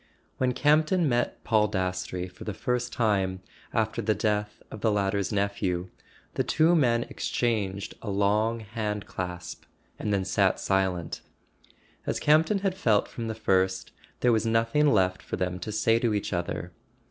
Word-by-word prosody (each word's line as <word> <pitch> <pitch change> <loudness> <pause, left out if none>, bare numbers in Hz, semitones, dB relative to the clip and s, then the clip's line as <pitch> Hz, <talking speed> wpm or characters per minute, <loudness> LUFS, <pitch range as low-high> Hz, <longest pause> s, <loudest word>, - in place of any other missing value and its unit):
When 125 -1 +2
Campton 155 +5 +3
met 120 -2 0
Paul 110 -2 +3
Dastrey 90 -2 -2
for 90 0 -12
the 105 - -4
first 125 +2 -1
time 95 -5 0 0.3
after 110 +1 0
the 110 0 +1
death 105 -1 -1
of 105 - -8
the 110 - +2
latter's 100 -1 0
nephew, 100 -3 -1 0.4
the - - 0
two 165 +2 +3
men 120 -6 +3
exchanged 100 -7 -2
a 110 - -5
long 105 +3 +1
hand 105 -1 -3
clasp 90 -2 -6 0.3
and 105 - -2
then 100 -2 +1
sat 95 0 +2
silent. 95 -3 -1 0.9
As - - 0
Campton 160 +7 +3
had 190 - +2
felt 110 - +2
from 115 -1 -6
the 110 - -3
first, 95 -3 +1 0.3
there 125 - +4
was 110 -1 +2
nothing 115 +6 +2
left 95 -4 +2
for - - -4
them 90 0 -2
to 100 +5 -5
say 110 +2 +2
to 115 -3 +1
each 105 - -2
other. 85 -1 -3
105 Hz, 160 wpm, -27 LUFS, 95-115 Hz, 0.9 s, there